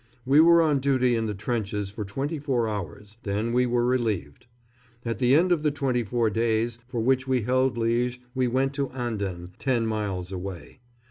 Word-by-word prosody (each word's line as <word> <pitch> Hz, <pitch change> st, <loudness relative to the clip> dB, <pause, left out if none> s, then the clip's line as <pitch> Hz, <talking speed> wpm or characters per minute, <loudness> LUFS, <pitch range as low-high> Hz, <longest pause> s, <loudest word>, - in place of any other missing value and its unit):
We 140 Hz, +3 st, +5 dB
were 170 Hz, +1 st, +7 dB
on 150 Hz, -3 st, +2 dB
duty 130 Hz, -3 st, +2 dB
in 115 Hz, -1 st, -1 dB
the 105 Hz, -, -3 dB
trenches 105 Hz, -2 st, -3 dB
for 105 Hz, +1 st, -5 dB
twenty 140 Hz, +10 st, -3 dB
four 130 Hz, -5 st, 0 dB
hours, 105 Hz, +1 st, -6 dB
then 105 Hz, +4 st, -2 dB
we 125 Hz, 0 st, +3 dB
were 120 Hz, 0 st, +1 dB
relieved. 120 Hz, -, -1 dB, 0.6 s
At 115 Hz, -2 st, -2 dB
the 125 Hz, +2 st, +4 dB
end 180 Hz, +4 st, +3 dB
of 170 Hz, -4 st, +3 dB
the 150 Hz, -, +2 dB
twenty 135 Hz, -4 st, 0 dB
four 115 Hz, 0 st, 0 dB
days 115 Hz, +1 st, 0 dB
for 120 Hz, -2 st, -3 dB
which 130 Hz, +2 st, +1 dB
we 130 Hz, -3 st, +1 dB
held 130 Hz, +1 st, +1 dB
Liège 120 Hz, +2 st, 0 dB, 0.2 s
we 130 Hz, -1 st, +1 dB
went 135 Hz, +3 st, 0 dB
to 140 Hz, -1 st, -2 dB
Anden, 100 Hz, -8 st, -4 dB
ten 125 Hz, -4 st, +1 dB
miles 100 Hz, -5 st, -3 dB
away. 95 Hz, -, -7 dB
120 Hz, 190 wpm, -26 LUFS, 105-130 Hz, 0.6 s, were